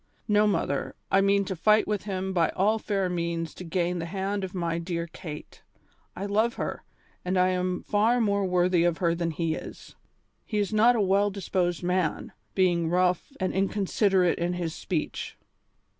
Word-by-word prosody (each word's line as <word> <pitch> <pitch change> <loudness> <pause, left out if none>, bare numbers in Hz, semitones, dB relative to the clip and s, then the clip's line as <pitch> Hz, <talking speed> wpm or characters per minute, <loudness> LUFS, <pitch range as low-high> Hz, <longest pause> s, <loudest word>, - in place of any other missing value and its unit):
No, 210 0 +4
mother, 140 -8 -1 0.2
I 195 - +5
mean 200 0 +3
to 190 - -3
fight 215 +5 +3
with 210 -1 -2
him 190 -1 -3
by 170 -3 +2
all 210 +4 +2
fair 195 -3 -1
means 170 -2 -2
to - - -9
gain 175 +1 -1
the 165 - -4
hand 195 +2 -2
of 190 0 -5
my 170 -2 -1
dear 170 -1 -3
Kate. 160 -2 -9 0.5
I 195 - -4
love 215 +4 +1
her, - - -4 0.4
and 185 +1 -1
I 185 0 +4
am 180 0 -1
far 225 +4 +2
more 200 -3 +1
worthy 180 -1 +2
of 170 -1 +1
her 170 -3 +1
than 170 0 -1
he 165 0 -1
is. - - -9 0.5
He 215 - -4
is 205 +1 0
not 230 +3 +5
a 225 - +2
well 200 +1 +3
disposed 185 -3 -1
man, 180 -2 -1 0.2
being 175 -3 +2
rough 180 - +1
and 185 -1 -1
inconsiderate 195 -1 +1
in 175 +1 0
his 170 -3 -3
speech." 170 -4 -4
185 Hz, 180 wpm, -27 LUFS, 170-200 Hz, 0.5 s, I